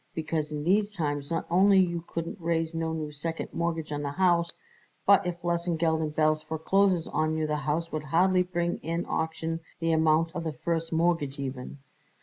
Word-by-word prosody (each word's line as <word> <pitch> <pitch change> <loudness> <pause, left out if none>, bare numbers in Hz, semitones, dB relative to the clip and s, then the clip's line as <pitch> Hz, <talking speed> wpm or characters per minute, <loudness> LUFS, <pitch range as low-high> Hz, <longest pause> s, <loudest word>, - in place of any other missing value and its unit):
Because 155 -1 -2
in 150 -1 -3
these 200 +4 +2
times 145 -4 -2
not 165 - -1
only 195 +3 +5
you 170 -3 +2
couldn't 165 +3 -5
raise 165 0 0
no 165 0 -1
new 155 -2 -4
second 160 +3 -4
mortgage 165 -2 -2
on 145 0 -2
the 145 - -2
house, 175 -1 +2 0.5
but 200 -2 +5
if 175 -1 -4
Lesengeld 170 -2 0
and 155 -1 -3
Belz 155 0 +2
forecloses 170 +3 +1
on 155 0 0
you 155 - 0
the 150 0 -1
house 150 +3 -2
would 155 -1 -3
hardly 180 +5 +3
bring 175 -1 -1
in 165 +2 -3
auction 160 0 -2 0.2
the 165 0 +1
amount 160 +1 +3
of 170 - -3
the 160 -2 -3
first 165 +4 -2
mortgage 165 -4 +1
even." 130 -1 -5
165 Hz, 185 wpm, -28 LUFS, 155-170 Hz, 0.5 s, only